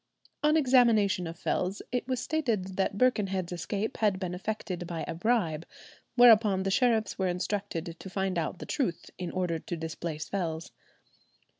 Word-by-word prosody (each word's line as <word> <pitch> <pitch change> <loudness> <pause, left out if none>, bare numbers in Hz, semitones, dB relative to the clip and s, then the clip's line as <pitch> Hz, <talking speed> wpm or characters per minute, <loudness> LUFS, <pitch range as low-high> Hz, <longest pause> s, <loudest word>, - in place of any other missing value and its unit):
On 300 +1 +4
examination 230 - +4
of 165 +1 -7
Fells, 185 +3 -1
it 250 0 -1
was 255 -2 -1
stated 230 -12 -1
that 195 +1 0
Birkenhead's 195 -8 +1
escape 200 +7 -3
had 205 -4 +2
been 180 -2 -3
effected 180 -2 -4
by 170 -2 -4
a - - -3
bribe, 170 -5 0 0.5
whereupon 220 -6 +6
the 195 - 0
sheriffs 220 -2 +2
were 190 - +2
instructed 180 -2 -3
to 190 - -8
find 190 -1 -1
out 165 +2 -3
the - - -7
truth 240 - -2
in 180 -2 -3
order 175 -3 -1
to 175 - -5
displace 160 -1 -5
Fells. 165 -4 -3
190 Hz, 160 wpm, -29 LUFS, 175-220 Hz, 0.5 s, whereupon